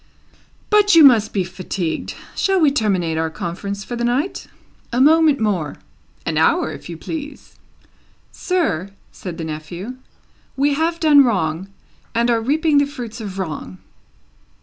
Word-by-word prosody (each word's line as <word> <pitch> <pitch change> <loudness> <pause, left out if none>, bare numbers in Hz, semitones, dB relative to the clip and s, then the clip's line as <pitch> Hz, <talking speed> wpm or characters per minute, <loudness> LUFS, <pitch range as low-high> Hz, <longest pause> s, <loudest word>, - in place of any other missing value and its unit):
But 415 -3 +5
you 325 - +9
must 230 -6 +6
be 195 - 0
fatigued. 180 -2 -4 0.2
Shall 390 -2 +2
we 305 -4 +4
terminate 185 - 0
our 160 0 0
conference 200 +5 -5
for 240 - -6
the 235 - -3
night?" 255 +10 -1 0.4
"A 240 - 0
moment 310 +1 +5
more." 185 -9 -1 0.5
"An 160 -2 0
hour, 160 0 +2
if 155 - -10
you 170 - -6
please." 290 - -7 0.8
"Sir," 310 - -1 0.2
said 180 -3 -8
the 165 - -5
nephew, 170 +10 -6 0.6
"we 285 +1 +2
have 330 +3 0
done 295 -3 +6
wrong, 185 -6 -1 0.5
and 235 +1 +2
are 230 -1 +1
reaping 295 +4 +2
the 285 - +2
fruits 245 -5 -7
of 200 -3 -6
wrong." 150 - -5
225 Hz, 150 wpm, -20 LUFS, 175-285 Hz, 0.8 s, you